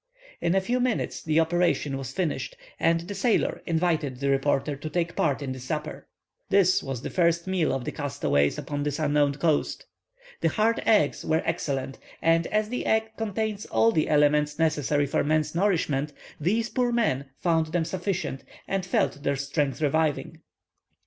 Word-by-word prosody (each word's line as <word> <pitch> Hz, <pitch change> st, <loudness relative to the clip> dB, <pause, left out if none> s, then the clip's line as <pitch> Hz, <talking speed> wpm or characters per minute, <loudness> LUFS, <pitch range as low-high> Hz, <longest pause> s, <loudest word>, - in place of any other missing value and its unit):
In 170 Hz, -, +1 dB
a 195 Hz, -, +3 dB
few 245 Hz, +6 st, 0 dB
minutes 250 Hz, -2 st, -1 dB
the 155 Hz, 0 st, +2 dB
operation 165 Hz, -4 st, +1 dB
was 135 Hz, -2 st, -5 dB
finished, 185 Hz, -, -2 dB, 0.2 s
and 165 Hz, 0 st, +2 dB
the 180 Hz, +4 st, -6 dB
sailor 210 Hz, +3 st, +1 dB
invited 160 Hz, -6 st, 0 dB
the 140 Hz, 0 st, +1 dB
reporter 135 Hz, +1 st, +1 dB
to 150 Hz, +3 st, -6 dB
take 170 Hz, +1 st, -1 dB
part 145 Hz, -2 st, 0 dB
in 135 Hz, -, -3 dB
the 130 Hz, -, -6 dB
supper. 150 Hz, +4 st, -5 dB, 0.4 s
This 190 Hz, -2 st, +4 dB
was 135 Hz, -3 st, -5 dB
the -, -, -4 dB
first 170 Hz, -2 st, +2 dB
meal 185 Hz, -4 st, +1 dB
of 130 Hz, -2 st, -2 dB
the -, -, -2 dB
castaways 140 Hz, -, 0 dB
upon 145 Hz, -1 st, -4 dB
this 145 Hz, -1 st, -1 dB
unknown 145 Hz, -2 st, +2 dB
coast. 155 Hz, 0 st, 0 dB, 0.5 s
The 165 Hz, -, +2 dB
hard 220 Hz, +6 st, +1 dB
eggs 205 Hz, -10 st, +3 dB
were 160 Hz, +1 st, +1 dB
excellent, 135 Hz, -5 st, -2 dB, 0.2 s
and 165 Hz, 0 st, +2 dB
as 215 Hz, 0 st, 0 dB
the 250 Hz, -, -2 dB
egg 220 Hz, 0 st, +1 dB
contains 215 Hz, -1 st, -3 dB
all 115 Hz, 0 st, +3 dB
the 155 Hz, -, +1 dB
elements 150 Hz, 0 st, +3 dB
necessary 150 Hz, -2 st, +1 dB
for 140 Hz, -, 0 dB
man's 155 Hz, 0 st, +1 dB
nourishment, 155 Hz, -6 st, 0 dB, 0.3 s
these 215 Hz, +9 st, +1 dB
poor 245 Hz, 0 st, 0 dB
men 215 Hz, -, +1 dB
found 165 Hz, -2 st, +1 dB
them 160 Hz, +1 st, -1 dB
sufficient, 180 Hz, -6 st, -3 dB, 0.2 s
and 195 Hz, -1 st, -1 dB
felt 175 Hz, -5 st, 0 dB
their 140 Hz, -1 st, 0 dB
strength 140 Hz, 0 st, -1 dB
reviving. 150 Hz, 0 st, 0 dB
160 Hz, 170 wpm, -26 LUFS, 145-185 Hz, 0.5 s, This